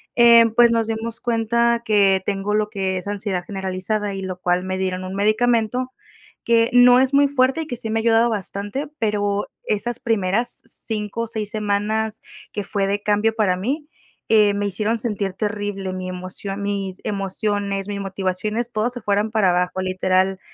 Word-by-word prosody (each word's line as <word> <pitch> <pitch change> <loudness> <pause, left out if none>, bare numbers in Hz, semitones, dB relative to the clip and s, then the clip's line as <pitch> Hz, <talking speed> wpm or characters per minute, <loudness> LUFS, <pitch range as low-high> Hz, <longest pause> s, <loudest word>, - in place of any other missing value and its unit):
Eh, 235 -1 +7
pues, 235 -1 +6
nos 225 -1 +1
dimos 225 +1 -4
cuenta 235 0 +1
que 200 -4 +3
tengo 200 +1 -1
lo 215 0 +1
que 190 -3 -2
es 185 - -6
ansiedad 195 -3 -2
generalizada 195 +2 -3
y 195 - -5
lo 185 -1 -5
cual 180 0 +1
me 185 0 -3
dieron 185 -1 -2
un 185 +1 -6
medicamento 230 +4 +1 0.5
que 230 0 +3
no 245 0 +7
es 265 +1 +1
muy 280 0 +5
fuerte 270 +2 +1
y 315 - -11
que 245 - -4
sí 225 -1 -5
me 225 +1 0
ha - - -1
ayudado 230 0 +4
bastante, 205 +5 -4
pero 205 -2 0 0.2
esas 235 +3 -2
primeras 225 +2 0
5 215 +1 -3
o - - -4
6 215 -2 -4
semanas 215 0 -1 0.3
que 205 - -3
fue 200 -1 -1
de 200 +1 -1
cambio 210 +2 +1
para 200 -5 +2
mí, 280 - -3 0.4
eh, 210 -2 +5
me 205 0 -1
hicieron 215 +4 -1
sentir 205 -4 -2
terrible 205 -2 -3
mi 185 0 -5
emoción, 185 +2 -6
mis 195 -2 -3
emociones, 200 0 -1
mis 200 -1 -4
motivaciones, 195 +5 -2
todas 215 +3 0
se 245 - -6
fueran 210 +1 0
para 210 -5 +3
abajo, 180 +1 0
literal. 185 0 +1
210 Hz, 180 wpm, -21 LUFS, 195-230 Hz, 0.5 s, Eh